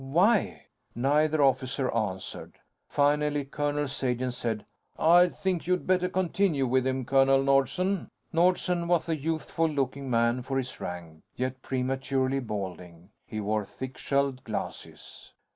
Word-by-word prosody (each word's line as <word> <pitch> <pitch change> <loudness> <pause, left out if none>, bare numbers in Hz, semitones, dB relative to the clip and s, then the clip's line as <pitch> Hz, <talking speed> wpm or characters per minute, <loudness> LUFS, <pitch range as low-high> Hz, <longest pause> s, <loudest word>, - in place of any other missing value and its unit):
"Why?" 195 +9 +2 0.3
Neither 150 +4 +2
officer 130 0 +1
answered. 100 -5 -3 0.4
Finally, 145 0 +2
Colonel 145 +1 -1
Sagen 130 -2 -1
said, 115 -3 -3 0.3
"I 175 +2 +6
think 180 -2 -2
you'd 180 0 +1
better 180 -1 +2
continue 180 -5 +1
with 130 +1 +2
him, 130 -1 -1
Colonel 135 +1 +4
Nordsen." 140 +8 +1 0.2
Nordsen 175 0 +2
was 175 -1 +2
a 165 - +1
youthful 160 +2 -1
looking 135 -2 -2
man 120 +1 +2
for 135 +2 -3
his 130 -1 -4
rank, 85 -3 -7
yet 130 0 -3
prematurely 130 +1 -1
balding. 95 -5 -6 0.2
He 110 - -5
wore 105 +1 0
thick 130 +6 -8
shelled 140 -2 -1
glasses. 110 - -7
135 Hz, 130 wpm, -28 LUFS, 125-155 Hz, 0.4 s, I